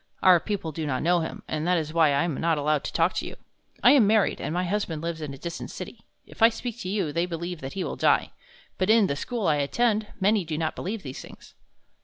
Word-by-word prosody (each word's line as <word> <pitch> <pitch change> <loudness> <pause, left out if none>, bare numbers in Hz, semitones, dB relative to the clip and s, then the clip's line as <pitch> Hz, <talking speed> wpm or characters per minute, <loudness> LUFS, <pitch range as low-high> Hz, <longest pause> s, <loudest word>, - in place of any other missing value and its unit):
"Our 185 -2 +7
people 200 -4 -3
do 155 0 -4
not 130 -3 -1
know 175 +2 +3
him, 160 - -5
and 155 +2 -2
that 180 0 +3
is 155 -1 -3
why 165 -1 +5
I 140 -1 +2
am 170 -2 -1
not 165 -1 +2
allowed 150 0 +1
to - - -3
talk 165 +2 +2
with - - -2
you. - - -7 0.5
I - - +8
am 260 -8 +6
married, 215 -1 +2
and - - -3
my 180 +2 0
husband 180 -4 -2
lives 165 -1 -3
in 150 -2 -5
a 135 - -8
distant 170 +4 -6
city. - - -9 0.2
If - - -16
I 225 - +8
speak 240 +1 -6
to 185 - -5
you, 190 -7 -1
they 170 +3 0
believe 170 0 -5
that 135 +1 -6
he 190 - -3
will - - -4
die. - - +2 0.5
But 185 +1 +1
in 220 -1 +6
the 140 - -1
school 230 - -3
I 155 -3 +3
attend, 215 +9 +1
many 205 +1 +3
do 155 -2 -4
not 160 -1 -2
believe 205 +3 -4
these 135 -2 -7
things." - - -14
170 Hz, 260 wpm, -26 LUFS, 155-205 Hz, 0.5 s, I